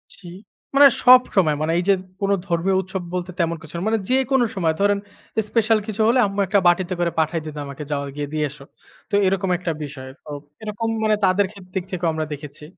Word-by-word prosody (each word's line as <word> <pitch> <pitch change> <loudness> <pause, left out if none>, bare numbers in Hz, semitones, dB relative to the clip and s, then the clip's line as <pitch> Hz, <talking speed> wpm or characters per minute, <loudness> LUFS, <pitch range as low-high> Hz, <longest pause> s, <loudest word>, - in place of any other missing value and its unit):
জি। 185 - -14 0.5
মানে 280 0 +9 0.2
সবসময় 215 -11 +5
মানে 155 +1 0
এই 175 - +1
যে, - - +7 0.3
কোন 200 0 +1 0.2
ধর্মীয় 175 +2 +1
উৎসব 190 0 -5
বলতে 180 0 -3
তেমন 170 0 0
কিছু 160 - -13
না। 170 - -4
মানে 220 0 +1
যেকোন 265 0 +2
সময় 165 -4 +1
ধরেন, 200 0 +2 0.5
স্পেশাল 225 -1 +3
কিছু 215 0 -3
হলে 245 +2 +4
আম্মু 200 0 -3
একটা 200 +2 +3
বাটিতে 180 +1 +2
করে 170 -1 +1
পাঠায় 160 +1 0
দিত 155 - -7
আমাকে 140 +2 -7
যাও 140 -1 -1
গিয়ে 145 -1 -3
দিয়ে 150 -1 0
এসো। 140 0 -13 0.5
তো - - -22
এরকম 190 0 0
একটা 175 -1 -3
বিষয়। 135 -2 -8 0.2
তো - - -13 0.3
এরকম 215 +1 -3 0.2
মানে 215 -1 +3
তাদের 190 +2 +3
খে 200 - -13
দিক 190 - -2
থেকেও 175 -2 -1
আমরা 155 0 -2
দেখেছি। 145 0 -10
185 Hz, 205 wpm, -22 LUFS, 160-205 Hz, 0.5 s, মানে